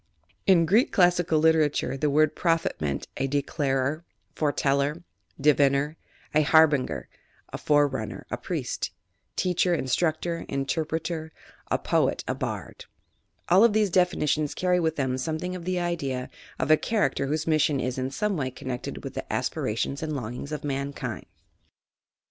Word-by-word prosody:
— 100 +2 -38
In 170 -3 +5
Greek 215 +10 +3
classical 175 -3 +3
literature, 155 -3 +2
the 150 +2 0
word 155 +1 +3
prophet 165 -1 +1
meant, 70 -2 -2
a 135 - 0
declarer, 140 +1 -1 0.3
foreteller, 145 +1 0 0.4
diviner, 140 +1 +3 0.4
a 155 - +5
harbinger, 155 -3 +3 0.5
a - - -4
forerunner, 145 -8 +1
a - - -1
priest, - - -3 0.5
teacher, 180 -1 +2
instructor, 160 +4 -1
interpreter; 160 +3 -2 0.4
a - - +2
poet, - - +1
a - - 0
bard. - - -5 0.6
All 185 +5 +6
of 230 -2 +5
these 210 -3 +2
definitions 155 -5 +1
carry 180 -1 +2
with 160 -2 0
them 130 -2 -1
something 165 +5 -3
of 175 -2 -7
the 185 0 0
idea 140 -8 -2 0.3
of 130 +4 0
a 155 - +7
character 205 -6 0
whose 155 +2 -1
mission 155 -3 +2
is 130 0 -2
in 130 +1 -1
some 205 +9 -1
way 135 -5 -1
connected 125 -1 -6
with - - -6
the - - -6
aspirations 115 +6 -2
and 155 -1 -3
longings 125 +3 -5
of 150 - -4
mankind. 140 0 -4
150 Hz, 145 wpm, -26 LUFS, 135-170 Hz, 0.6 s, a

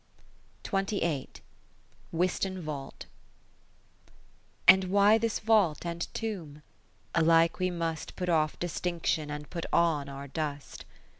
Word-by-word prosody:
Wiston 185 +2 -1
Vault 150 -5 -7 1.6
And 190 0 +8
why 200 +3 +5
this 225 -1 0
vault 210 -8 +2
and 170 0 -4
tomb? 165 -10 -5 0.5
Alike 165 +1 +4
we 185 0 +1
must 165 -3 -4
Put 180 - -3
off 155 -3 +1
distinction, 170 -3 -2
and 150 0 -6
put 170 -2 -4
on 155 -5 +2
our 140 0 -7
dust. 145 -1 -5
170 Hz, 100 wpm, -29 LUFS, 150-185 Hz, 1.6 s, And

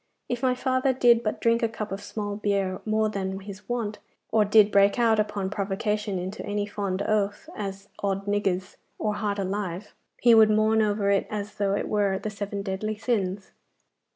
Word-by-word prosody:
If 245 -1 -3
my 255 -1 +2
father 260 +1 +1
did 240 -2 +5
but 215 - -2
drink 230 0 +2
a 230 - +2
cup 215 -2 -6
of 195 +1 -4
small 205 0 -4
beer 200 -2 -1
more 215 0 +2
than 195 -2 -3
his 200 +1 -10
wont, 225 -4 -2 0.3
or 220 -1 +4
did 210 0 +5
break 200 +2 +4
out 225 -2 +3
upon 205 -2 -1
provocation 210 0 -1
into 185 +4 -5
any 205 0 -2
fond 200 -2 -3
oath, 205 -1 0
as 195 -1 -5
"Od's 195 -1 -1
niggers!" 195 -2 -1 0.2
or 210 -1 -1
"Heart 205 -1 -2
alive!" 195 -1 -3 0.3
he 240 -1 +6
would 220 -1 +7
mourn 215 +1 +3
over 205 -1 +1
it 200 - +1
as 210 -1 -4
though 200 -1 0
it - - -2
were 200 -2 +1
the 215 +2 -4
seven 200 -1 -4
deadly 210 +2 -3
sins. 200 -4 -2
205 Hz, 185 wpm, -26 LUFS, 195-215 Hz, 0.3 s, would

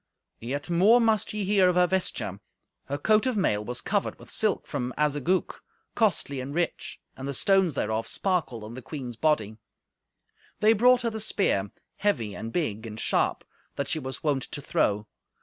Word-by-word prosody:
Yet 135 +5 -4
more 190 +8 +5
must 220 -3 +2
ye 210 -1 -2
hear 195 -2 +4
of 180 - +1
her 180 0 +5
vesture. 175 - -1 0.5
Her 140 - -3
coat 215 - +3
of 250 -4 0
mail 105 - +1
was 125 +3 -3
covered 200 -1 -1
with - - -13
silk 215 -2 0
from 125 -4 -4
Azagouc, 150 +5 0 0.3
costly 185 - +1
and 140 +3 -6
rich, 175 0 -2 0.2
and 135 - -6
the 140 - -2
stones 190 - +3
thereof 110 +1 -1
sparkled 170 - -1
on 110 +2 -8
the 130 - -7
queen's 125 -2 -6
body. 110 -7 +1 1.0
They 215 +1 +5
brought 245 +3 +5
her 230 - 0
the 220 - -5
spear, 145 - +1 0.3
heavy 120 - 0
and 115 - -6
big 115 -9 -2
and 110 0 -7
sharp, - - +1 0.3
that 140 - -2
she 160 - 0
was 130 -2 -7
wont 145 -4 +1
to - - -6
throw. 105 -6 0
150 Hz, 180 wpm, -27 LUFS, 120-200 Hz, 1.0 s, more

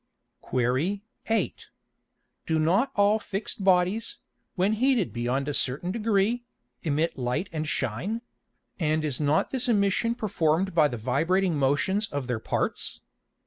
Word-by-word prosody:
Qu. 130 +11 0 0.3
8. 225 - -1 0.8
Do 160 - +2
not 185 - +2
all 205 +2 +4
fix'd 200 0 -5
Bodies, 190 +3 +2 0.4
when 195 +3 +2
heated 255 +2 +2
beyond 125 +4 -1
a 145 - -1
certain 140 +8 0
degree, 220 +2 +1 0.4
emit 155 -1 0
Light 125 +9 -1
and 155 -1 -3
shine; 155 - -2 0.6
and 155 -1 +1
is 140 -5 -1
not 150 +1 +2
this 255 -1 +1
Emission 210 +2 +2
perform'd 185 -4 0
by 155 -3 +5
the 120 - -5
vibrating 165 - +1
motions 145 +10 +1
of 145 -5 -4
their 120 -3 -2
parts? - - -2
175 Hz, 135 wpm, -27 LUFS, 145-205 Hz, 0.8 s, by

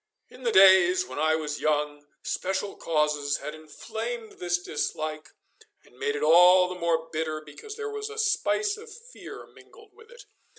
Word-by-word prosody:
In 250 - -15
the 240 -2 0
days 190 -2 +6
when 130 +3 -7
I 155 +1 +2
was 150 -2 -4
young, 145 -1 -1 0.2
special 190 +2 -3
causes 150 -2 0
had 150 - -7
inflamed 220 +9 -7
this 175 0 0
dislike 155 -2 -4 0.6
and - - -23
made 145 - -1
it 145 - -3
all 180 +3 +7
the 180 0 -7
more 165 -1 0
bitter 155 0 -2
because 155 - -11
there 435 -1 -5
was 425 0 -5
a 435 - -10
spice 430 -1 0
of 445 +2 -12
fear 470 +3 -11
mingled 435 -4 -19
with 455 +3 -19
it. 485 0 -14
180 Hz, 170 wpm, -26 LUFS, -, 0.6 s, all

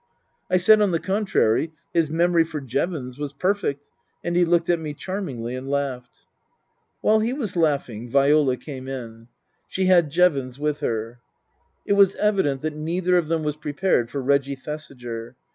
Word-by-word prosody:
I 185 - +4
said, 210 +4 +6
on 205 - +3
the 170 -2 0
contrary, 165 - +1 0.2
his 165 -3 +2
memory 170 +1 +3
for 160 -2 -5
Jevons 135 0 -3
was 145 -1 -4
perfect, 145 -4 -1 0.3
and 175 - -2
he 175 0 +4
looked 170 0 +2
at 175 -1 +2
me 155 -2 -5
charmingly 140 - -5
and 130 +1 -6
laughed. 135 -3 -3 0.8
While 215 0 +4
he 225 +3 0
was 235 -10 -4
laughing 140 -8 0
Viola 140 0 +3
came 130 -3 -8
in. 115 -4 -7 0.4
She 190 - -1
had 175 -4 +4
Jevons 140 -6 +2
with 150 0 -1
her. 115 +1 -3 0.7
It - - +2
was 200 -1 +5
evident 190 -11 +1
that 155 -1 -2
neither 175 +4 0
of 175 -3 +2
them 165 0 0
was 150 0 -2
prepared 145 -5 0
for 140 +1 -4
Reggie 140 +1 +1
Thesiger. 125 -5 -7
150 Hz, 165 wpm, -23 LUFS, 130-175 Hz, 0.8 s, said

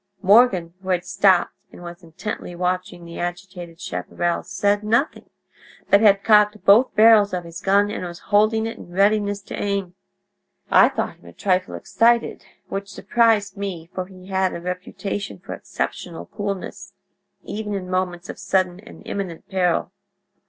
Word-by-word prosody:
"Morgan, 195 -5 +4
who 190 - -8
had 180 -1 0
stopped 185 -1 +3 0.2
and - - -13
was 175 +1 -9
intently 175 +2 -7
watching 180 0 -3
the 170 0 -9
agitated 175 -1 -6
chaparral, 175 -1 -2
said 205 +2 0
nothing, 230 +8 0 0.6
but 200 - +6
had 200 -2 +5
cocked 210 -1 +4
both 220 +6 +5
barrels 215 -3 +6
of 180 - -4
his 170 0 -9
gun, 200 +1 +3
and - - -5
was 175 -1 -6 0.2
holding 215 +2 +3
it 225 - -6
in - - -12
readiness 200 +2 +1
to - - -9
aim. 200 -3 -2 0.8
I - - +7
thought - - -4
him - - -23
a - - -12
trifle 185 -2 0
excited, 230 +5 +1 0.2
which 195 0 -5
surprised 210 -2 +1
me, 180 -4 -6
for 185 -1 -4
he 185 -1 -14
had 190 -1 0
a - - -5
reputation 180 - -5
for - - -8
exceptional 85 - -5
coolness, 200 - -6 0.5
even 210 -1 -4
in 185 -2 -5
moments 185 -1 -2
of - - -8
sudden 185 -2 0
and 210 - -14
imminent 185 -5 -5
peril. 180 -3 0
195 Hz, 160 wpm, -22 LUFS, 180-205 Hz, 0.8 s, I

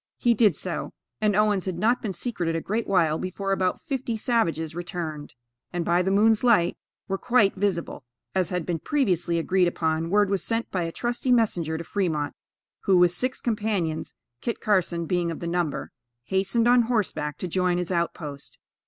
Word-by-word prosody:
He 240 -2 +3
did 210 -6 +4
so; 175 +2 -3 0.3
and 210 -2 +2
Owens 210 -2 +2
had 185 -3 -3
not 235 +3 +2
been 215 - -2
secreted 180 -6 -2
a - - 0
great 220 +6 -2
while 165 -5 +2
before 195 +1 -3
about 185 -1 +1
fifty 265 -7 -3
savages 165 - 0
returned, 165 -6 -5 0.4
and, 175 -1 -2
by 175 +1 +3
the 185 - 0
moon's 215 +3 +4
light, 210 -8 +4 0.3
were 195 0 -2
quite 225 -5 +3
visible. 185 -7 -2 0.3
As 185 -2 +1
had 180 -3 -2
been 170 -2 -2
previously 180 - 0
agreed 180 +2 +2
upon, 160 -1 -1
word 205 +1 +3
was 195 - 0
sent 230 0 -2
by 185 - -1
a 165 - -4
trusty 240 +5 -1
messenger 175 -10 +2
to 165 - -5
Fremont, 160 -6 -1 0.5
who, 190 -2 +5
with 175 -1 +5
six 255 +8 -1
companions, 205 -8 -1 0.3
Kit 235 - -3
Carson 180 -5 +1
being 175 0 0
of 165 - -5
the - - -5
number, 170 -3 -2 0.3
hastened 195 - +1
on 245 0 +6
horseback 180 -10 -1
to 185 - -4
join 180 0 +1
his 180 0 -2
outpost. 155 -5 -3
185 Hz, 180 wpm, -25 LUFS, 170-215 Hz, 0.5 s, on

